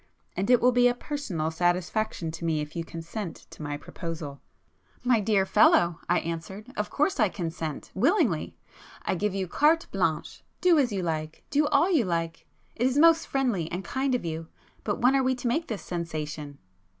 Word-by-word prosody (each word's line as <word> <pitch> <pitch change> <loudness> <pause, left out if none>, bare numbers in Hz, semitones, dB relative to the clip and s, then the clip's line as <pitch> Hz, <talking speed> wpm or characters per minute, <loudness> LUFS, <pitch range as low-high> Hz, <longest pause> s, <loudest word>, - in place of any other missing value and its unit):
And 195 +4 -1
it 250 -1 +6
will 250 - +5
be 245 0 +5
a 245 - +2
personal 225 - -3
satisfaction 175 +1 0
to 165 +1 -8
me 160 -2 +1
if 150 0 -5
you 165 - -2
consent 165 +3 -7
to - - -11
my 145 -1 -3
proposal." 160 -3 -7 0.6
[p 250 - -2
218]"My 240 -3 +5
dear 205 -2 +2
fellow—" 170 -3 +4
I 175 - +4
answered—"Of 195 +7 -5
course 300 +1 0
I 215 -3 +4
consent—willingly! 175 - -1 0.5
I - - 0
give 195 +2 -1
you 190 -1 -1
carte 315 - +3
blanche,—do 355 -4 0
as 255 -5 +2
you 195 -3 -2
like; 155 -2 -3
do 295 +1 +3
all 300 +5 +3
you 295 - +3
like! 165 -2 -3 0.3
It 245 +2 +2
is 260 +2 0
most 330 +1 +5
friendly 235 - 0
and 180 +3 -4
kind 265 0 0
of 240 - -3
you! 160 0 -4 0.4
But 205 - -1
when 250 +3 +5
are 270 - +4
we 260 0 +1
to 245 0 -4
make 310 +8 0
this 215 -4 -4
sensation?" 155 -4 -5
195 Hz, 185 wpm, -27 LUFS, 165-255 Hz, 0.6 s, it